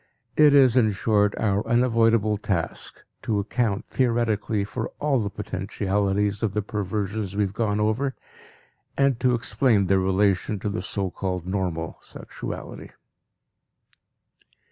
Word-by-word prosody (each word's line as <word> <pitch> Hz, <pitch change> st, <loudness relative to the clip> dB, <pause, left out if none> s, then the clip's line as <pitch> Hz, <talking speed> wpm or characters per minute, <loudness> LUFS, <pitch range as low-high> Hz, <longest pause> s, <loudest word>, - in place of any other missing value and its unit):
It 150 Hz, -2 st, +6 dB
is, 130 Hz, -4 st, +6 dB
in 110 Hz, -5 st, +4 dB
short, 105 Hz, 0 st, +1 dB
our 105 Hz, -1 st, +1 dB
unavoidable 115 Hz, -3 st, +3 dB
task 90 Hz, -5 st, -3 dB, 0.2 s
to 110 Hz, -, -1 dB
account 105 Hz, 0 st, -1 dB
theoretically 115 Hz, -4 st, 0 dB
for 110 Hz, +3 st, -4 dB
all 145 Hz, -3 st, +1 dB
the 100 Hz, -, -2 dB
potentialities 100 Hz, +1 st, -1 dB
of 105 Hz, -3 st, -1 dB
the 105 Hz, -, 0 dB
perversions 105 Hz, -1 st, -3 dB
we 105 Hz, -, +2 dB
have 95 Hz, -1 st, -3 dB
gone 105 Hz, -1 st, 0 dB
over 115 Hz, +6 st, 0 dB, 0.8 s
and 140 Hz, -3 st, +2 dB
to 125 Hz, -1 st, +3 dB
explain 115 Hz, -3 st, +2 dB
their 95 Hz, +1 st, +3 dB
relation 95 Hz, +2 st, +1 dB
to 105 Hz, -, -1 dB
the 105 Hz, 0 st, -3 dB
so 95 Hz, 0 st, -3 dB
called 90 Hz, -2 st, -3 dB
normal 90 Hz, -4 st, -3 dB
sexuality. -, -, -8 dB
105 Hz, 130 wpm, -24 LUFS, 100-115 Hz, 0.8 s, It